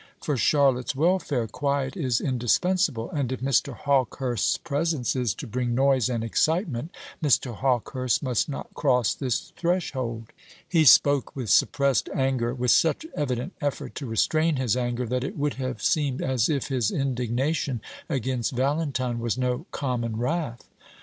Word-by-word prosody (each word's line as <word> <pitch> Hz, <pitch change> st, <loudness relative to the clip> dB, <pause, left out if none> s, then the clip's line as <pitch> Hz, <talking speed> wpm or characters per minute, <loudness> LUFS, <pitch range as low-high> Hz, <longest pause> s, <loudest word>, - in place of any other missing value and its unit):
For 145 Hz, -, -1 dB
Charlotte's 135 Hz, -1 st, +2 dB
welfare 155 Hz, -5 st, +1 dB
quiet 140 Hz, -, -1 dB
is 130 Hz, -10 st, 0 dB
indispensable; 130 Hz, -, 0 dB
and 140 Hz, -4 st, -2 dB
if 130 Hz, -, -3 dB
Mr. 135 Hz, 0 st, +1 dB
Hawkehurst's 130 Hz, -3 st, 0 dB
presence 150 Hz, -4 st, -1 dB
is 120 Hz, -5 st, 0 dB
to -, -, -7 dB
bring 120 Hz, 0 st, -2 dB
noise 135 Hz, -1 st, +3 dB
and 115 Hz, -3 st, -1 dB
excitement, 155 Hz, -, 0 dB, 0.3 s
Mr. 130 Hz, -4 st, +2 dB
Hawkehurst 130 Hz, +1 st, 0 dB
must 125 Hz, +1 st, 0 dB
not 140 Hz, -, -6 dB
cross 125 Hz, -3 st, +2 dB
this 130 Hz, -5 st, -3 dB
threshold." 130 Hz, -11 st, -2 dB, 0.4 s
He 165 Hz, -3 st, +3 dB
spoke 140 Hz, +2 st, +5 dB
with 125 Hz, -6 st, -2 dB
suppressed 140 Hz, -2 st, +3 dB
anger; 130 Hz, -3 st, 0 dB
with 125 Hz, 0 st, +1 dB
such 165 Hz, -, +3 dB
evident 130 Hz, +3 st, -2 dB
effort 145 Hz, -2 st, -3 dB
to 140 Hz, -, -6 dB
restrain 155 Hz, +8 st, +2 dB
his 130 Hz, -5 st, +1 dB
anger, 120 Hz, 0 st, -1 dB
that 125 Hz, +2 st, -1 dB
it 135 Hz, -, -5 dB
would 145 Hz, 0 st, 0 dB
have 130 Hz, -1 st, -4 dB
seemed 145 Hz, -4 st, +1 dB
as 130 Hz, -3 st, +1 dB
if 145 Hz, -3 st, -1 dB
his 125 Hz, -6 st, +1 dB
indignation 130 Hz, +1 st, -1 dB, 0.3 s
against 130 Hz, -5 st, -1 dB
Valentine 130 Hz, -2 st, -1 dB
was 115 Hz, 0 st, -1 dB
no 125 Hz, +5 st, -1 dB
common 120 Hz, -5 st, -2 dB
wrath. 125 Hz, 0 st, -2 dB
130 Hz, 150 wpm, -25 LUFS, 120-145 Hz, 0.4 s, spoke